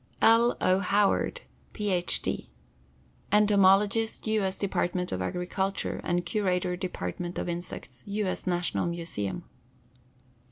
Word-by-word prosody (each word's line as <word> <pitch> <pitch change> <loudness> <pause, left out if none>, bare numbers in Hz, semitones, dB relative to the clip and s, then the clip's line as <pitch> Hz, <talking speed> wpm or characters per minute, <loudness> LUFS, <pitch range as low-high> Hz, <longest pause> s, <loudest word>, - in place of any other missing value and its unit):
L. 230 +2 +5
O. 185 +1 +3
HOWARD, 205 - +1 0.3
PH. 190 -5 0
D., - - -3 0.8
Entomologist 205 +1 +4
U. 220 -1 +1
S. 190 -1 -1
Department 180 -2 -1
of 95 - -2
Agriculture, 180 - -2
and 175 0 0
Curator 180 -4 0
Department 175 - -4
of - - -2
Insects, 170 -7 -6
U. 205 +1 -1
S. 185 - -3
National 175 -1 0
Museum. 170 - -3
185 Hz, 115 wpm, -28 LUFS, 175-205 Hz, 0.8 s, L